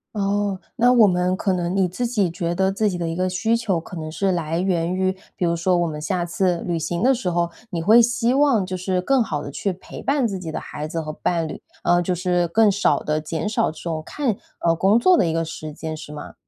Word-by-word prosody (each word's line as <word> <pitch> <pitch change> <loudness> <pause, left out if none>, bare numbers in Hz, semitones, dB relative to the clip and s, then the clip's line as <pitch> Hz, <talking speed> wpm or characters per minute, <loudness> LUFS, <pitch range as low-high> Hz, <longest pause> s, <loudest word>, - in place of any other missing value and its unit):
哦， 200 -1 0 0.2
那 245 +1 +5
我 230 -3 +7
们 180 0 +1
可 190 0 0
能 175 0 -1
你 190 -2 +3
自 240 +8 -2
己 205 -8 0
觉 170 -1 -2
得 190 +1 +2
自 210 +2 +1
己 180 - -3
的 170 - -2
一 165 - -3
个 185 +1 0
需 220 +5 +1
求 205 -7 0
可 175 - -10
能 155 0 -5
是 195 +3 0
来 165 -1 -1
源 180 -2 0
于 185 0 +1 0.2
比 180 - -1
如 170 0 +1
说 180 +2 +1
我 175 -1 +1
们 150 -1 -5
下 175 +2 -1
次 175 +1 0
旅 170 -2 -2
行 170 +5 -2
的 265 - +5
时 230 -8 -2
候， 170 0 0 0.2
你 170 -6 -3
会 220 +6 +7
希 240 +1 +2
望 270 -8 +3
就 185 0 -4
是 185 0 -1
更 270 +7 +2
好 150 -7 -3
地 140 - -6
去 195 +6 -2
陪 185 - -10
伴 275 -3 +1
自 195 -3 -4
己 165 -3 -6
的 - - -3
孩 150 +1 -6
子 165 +1 -3
和 155 -1 -5
伴 165 0 -1
侣， - - -8 0.2
呃， 175 0 +3
就 180 +1 -1
是 175 -1 +1
更 220 +3 +4
少 200 +1 +2
的 150 0 -1
减 160 +5 -3
少 215 - +1
这 155 - -15
种 160 -2 -3
看 260 -9 -1 0.3
呃， 165 - +5
工 195 +6 +4
作 360 +9 +5
的 - - +3
一 160 - 0
个 165 0 0
时 155 -1 -7
间， 160 0 -5
是 150 -1 -9
吗？ 150 - -8
180 Hz, 280 characters per minute, -22 LUFS, 165-205 Hz, 0.3 s, 我